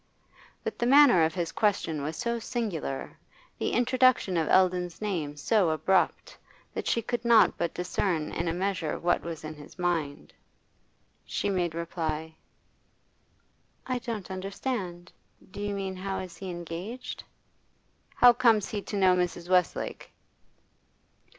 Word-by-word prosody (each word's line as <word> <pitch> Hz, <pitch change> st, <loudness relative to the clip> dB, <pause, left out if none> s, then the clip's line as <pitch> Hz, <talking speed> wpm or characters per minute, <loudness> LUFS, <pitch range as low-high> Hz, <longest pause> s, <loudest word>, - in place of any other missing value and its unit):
But -, -, -4 dB
the 240 Hz, -, +1 dB
manner 270 Hz, -, +7 dB
of 160 Hz, -, -2 dB
his 175 Hz, -2 st, -2 dB
question 190 Hz, -8 st, 0 dB
was 155 Hz, +3 st, -4 dB
so 235 Hz, -1 st, -1 dB
singular, 210 Hz, -, -4 dB, 0.4 s
the -, -, 0 dB
introduction 250 Hz, -5 st, +3 dB
of 160 Hz, -2 st, +1 dB
Eldon's 180 Hz, -2 st, +2 dB
name 165 Hz, -9 st, -3 dB
so 190 Hz, +4 st, +2 dB
abrupt, 165 Hz, +4 st, +1 dB, 0.4 s
that -, -, -4 dB
she 230 Hz, -, +1 dB
could 240 Hz, +1 st, -2 dB
not 235 Hz, -1 st, +5 dB
but 170 Hz, -1 st, -2 dB
discern 180 Hz, -3 st, -1 dB
in 170 Hz, -, -2 dB
a -, -, +1 dB
measure 180 Hz, -4 st, -1 dB
what 175 Hz, +1 st, +1 dB
was 165 Hz, -2 st, -6 dB
in 155 Hz, 0 st, -6 dB
his 150 Hz, +4 st, -14 dB
mind. 170 Hz, -5 st, -2 dB, 0.9 s
She 205 Hz, -, -2 dB
made 175 Hz, -4 st, -1 dB
reply: 160 Hz, -2 st, -3 dB, 1.5 s
'I 255 Hz, -1 st, -1 dB
don't 220 Hz, -6 st, -5 dB
understand. 190 Hz, -2 st, -4 dB, 0.4 s
Do 205 Hz, -, -7 dB
you 205 Hz, 0 st, -2 dB
mean 190 Hz, -1 st, -3 dB
how 195 Hz, +1 st, -3 dB
is 185 Hz, -2 st, -6 dB
he 190 Hz, -, -6 dB
engaged?' 175 Hz, +8 st, -6 dB, 0.9 s
'How 245 Hz, -1 st, +8 dB
comes 230 Hz, -4 st, +3 dB
he 210 Hz, -, -3 dB
to 205 Hz, -, -5 dB
know 185 Hz, -2 st, +5 dB
Mrs. 175 Hz, -1 st, -2 dB
Westlake? 180 Hz, -2 st, 0 dB
185 Hz, 140 wpm, -28 LUFS, 165-210 Hz, 1.5 s, How